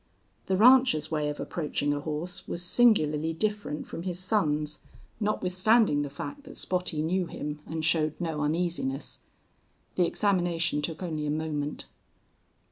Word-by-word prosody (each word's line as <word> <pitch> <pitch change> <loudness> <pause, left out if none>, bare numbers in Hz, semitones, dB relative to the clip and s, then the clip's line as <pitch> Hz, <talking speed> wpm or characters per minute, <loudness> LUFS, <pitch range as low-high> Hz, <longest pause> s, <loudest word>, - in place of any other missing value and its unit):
The 190 - +1
rancher's 240 - +5
way 150 -2 0
of 145 - -5
approaching 145 -3 -1
a 145 - -2
horse 155 +4 -4
was 170 - -1
singularly 165 -8 +3
different 205 -4 -2
from - - -7
his 175 -1 -3
son's, 155 -6 +1 0.4
notwithstanding 205 -3 +2
the 145 - -3
fact 285 - -7
that - - -11
Spottie 180 -4 -1
knew 180 +2 0
him 150 -2 -5
and 160 -1 -3
showed 155 -2 +2
no 160 -4 -2
uneasiness. 155 -3 -2 0.8
The 180 -2 +4
examination 175 -6 +1
took 165 +4 -4
only 155 -4 -3
a - - -1
moment. 150 -1 -3
165 Hz, 140 wpm, -28 LUFS, 150-185 Hz, 0.8 s, rancher's